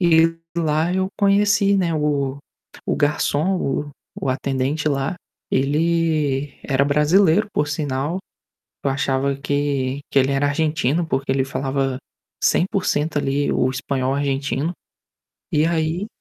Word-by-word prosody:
E 165 -1 +4 0.2
lá 160 +1 +1
eu 190 0 0
conheci, 200 0 +3
né, 170 -4 +1
o 140 -2 0 0.5
o - - 0
garçom, 150 +4 +1
o 145 -1 -2 0.3
o 135 - -1
atendente 135 +3 -1
lá, 135 +3 -1 0.4
ele 150 -1 +1
era 135 -1 +1
brasileiro, 160 +7 +3
por 150 - 0
sinal. 145 +3 -2 0.7
Eu 140 - +2
achava 135 0 0
que 140 -1 -1
que - - +3
ele 135 +1 +3
era 140 +1 +1
argentino 155 +1 0
porque 135 -3 -1
ele 135 -1 +1
falava 135 -1 -2 0.4
100%, 165 -5 +1
ali, 140 0 0
o 130 - +2
espanhol 130 0 -1
argentino. 140 +3 -1 0.8
E 150 +1 +3
aí 165 +3 0
145 Hz, 125 wpm, -21 LUFS, 135-165 Hz, 0.8 s, E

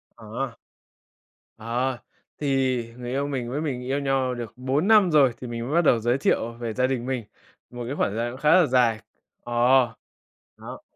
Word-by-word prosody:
Ờ. 115 +3 -5 1.0
Ờ, 120 +3 -2 0.4
thì 135 -3 +1 0.2
người 120 0 -6
yêu 140 +2 -1
mình 130 -4 -3
với 145 +4 -2
mình 135 -6 -3
yêu 135 +2 -1
nhau 135 -2 0
được 120 -2 -6
4 135 - 0
năm 210 -5 +6
rồi, 140 -5 +5
thì 125 - -6
mình 115 0 -5
mới 140 - -3
bắt 170 - +5
đầu 120 - +4
giới 120 +4 +1
thiệu 115 -3 0
về 115 -1 -5
gia 130 +3 +1
đình 125 -2 -2
mình, 130 -3 -2 0.5
một 120 0 -7
cái 135 - -3
khoảng - - +1
thời 105 - -6
gian 120 +1 -1
cũng 130 - -10
khá 150 - +3
là 180 - +5
dài. 120 -4 +2 0.4
Ờ, 120 - -7 1.1
đó. - - -9
130 Hz, 195 wpm, -25 LUFS, 120-135 Hz, 1.1 s, năm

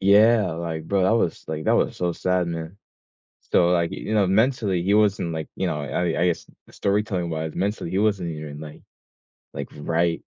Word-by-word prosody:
Yeah. 105 0 +5
Like, 80 -1 -4
bro, 100 +1 +1
that 95 - +3
was, 115 -7 0
like, 80 0 -4
that - - +3
was - - +1
so 90 -1 0
sad, 90 0 0
man. 85 +2 -5 0.8
So, 85 - +4
like, 85 -2 +1
you 110 - -4
know, 105 -2 +4
mentally, 105 -3 +2
he 100 +3 +2
wasn't, 100 -5 +2
like 80 -1 -4
you - - -1
know, 75 - -2
I 85 +3 -1
I - - +4
guess, 85 - -2 0.2
storytelling 100 -4 -1
wise, 80 0 -3
mentally, 100 -1 -2
he 95 - +1
wasn't 100 -5 +1
even, 75 -1 -7
like 75 -1 -10 0.7
like, - - -5
right. 85 +3 0
90 Hz, 190 wpm, -24 LUFS, 80-100 Hz, 0.8 s, Yeah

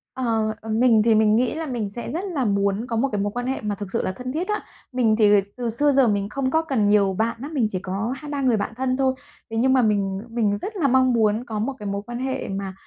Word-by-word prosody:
Ờ, 225 -4 0
ờ, 225 - -9
mình 225 0 +4
thì 225 -1 +5
mình 215 0 +4
nghĩ 245 +2 +1
là 320 0 -3
mình 240 -7 -3
sẽ 235 +4 -6
rất 345 +7 -3
là 265 -3 0
muốn 200 +1 0
có 235 - -3
một 260 +5 +1
cái 205 -2 -1
mối 205 0 -1
quan 245 +3 -4
hệ 265 - -2
mà 210 -1 -2
thực 200 -1 -7
sự 230 - 0
là - - -1
thân 255 0 -5
thiết 330 +6 -2
đó. 420 - 0 0.4
Mình 240 -4 +2
thì 215 -2 +4 0.3
từ 240 -2 -2
xưa 290 +6 +3
giờ 270 -2 +4
mình 200 -2 0
không 265 +3 -2
có 320 - +3
cần 265 -10 0
nhiều 200 -2 +3
bạn 230 +1 0
lắm, 290 +4 -6
mình 250 -7 +2
chỉ 185 - -2
có 195 +6 -3
2-3 290 +1 -5
người 250 -4 +3
bạn 205 +2 -3
thân 255 +1 -1
thôi. 265 -1 +2 0.4
Thế 225 - -3
nhưng 260 +3 +3
mà 260 - +4
mình 200 -4 +1
mình 220 -3 0
rất 420 - -6
là 310 -6 +2
mong 260 -1 +3
muốn 220 0 +2
có 220 -3 -4
một 255 +6 -1
cái 210 - -8
mối 200 0 -2
quan 240 +1 -6
hệ 265 +1 -3
mà 195 -1 -4
230 Hz, 285 wpm, -23 LUFS, 210-260 Hz, 0.4 s, thì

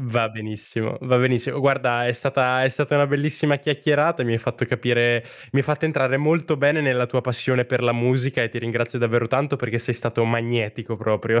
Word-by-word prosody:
Va 120 -3 0
benissimo 110 0 -5
va 125 -1 +2
benissimo. 125 +1 +1
Guarda 130 -3 +1
è 125 - +2
stata 130 0 +1
è 130 - +4
stata 140 +2 -1
una 145 0 +4
bellissima 145 +1 +1
chiacchierata, 145 +2 +1
e - - -2
mi 120 - -1
hai 115 - +1
fatto 120 +1 -3
capire 120 -1 +1 0.3
mi 135 - +2
hai 140 - +2
fatto 150 +1 -1
entrare 135 -4 +1
molto 155 +2 +1
bene 145 +3 +3
nella 125 -4 +1
tua 125 +1 -1
passione 125 0 0
per 125 0 -1
la 120 -1 +3
musica, 125 +2 0
e 115 - 0
ti 120 - -7
ringrazio 120 +1 -3
davvero 120 0 +1
tanto 140 +3 0
perché 120 -2 -3
sei 115 +1 -2
stato 115 0 -1
magnetico 115 -1 -2
proprio. 110 +1 0
125 Hz, 205 wpm, -22 LUFS, 120-140 Hz, 0.3 s, è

